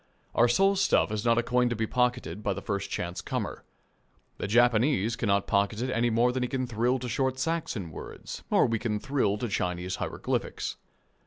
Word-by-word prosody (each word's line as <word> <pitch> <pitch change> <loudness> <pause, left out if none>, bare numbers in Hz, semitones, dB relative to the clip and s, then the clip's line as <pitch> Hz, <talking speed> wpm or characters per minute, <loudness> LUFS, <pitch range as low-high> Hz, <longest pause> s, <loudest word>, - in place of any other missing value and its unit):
Our 120 - +5
soul 195 +11 +3
stuff 190 - +3
is 110 0 -2
not 115 -1 +3
a 120 - +3
coin 125 0 +2
to 120 - -1
be 110 0 0
pocketed 125 -7 0
by 100 -2 0
the 100 - -6
first 100 -2 -2
chance 85 0 -3
comer. - - -4 0.8
The - - -2
Japanese 120 0 +3
cannot 100 -3 +1
pocket 100 +2 +1
it 130 +2 -1
any 120 -1 +2
more 120 +2 +3
than 130 +1 -2
he 125 - -1
can 130 -1 -1
thrill 120 +2 +1
to 125 0 -5
short 130 +1 0
Saxon 130 - -2
words - - -8
or - - +4
we 115 -1 0
can 105 -2 -1
thrill 110 -6 0
to 120 - -2
Chinese 90 -2 -2
hieroglyphics. - - -3
115 Hz, 195 wpm, -28 LUFS, 105-125 Hz, 0.8 s, Our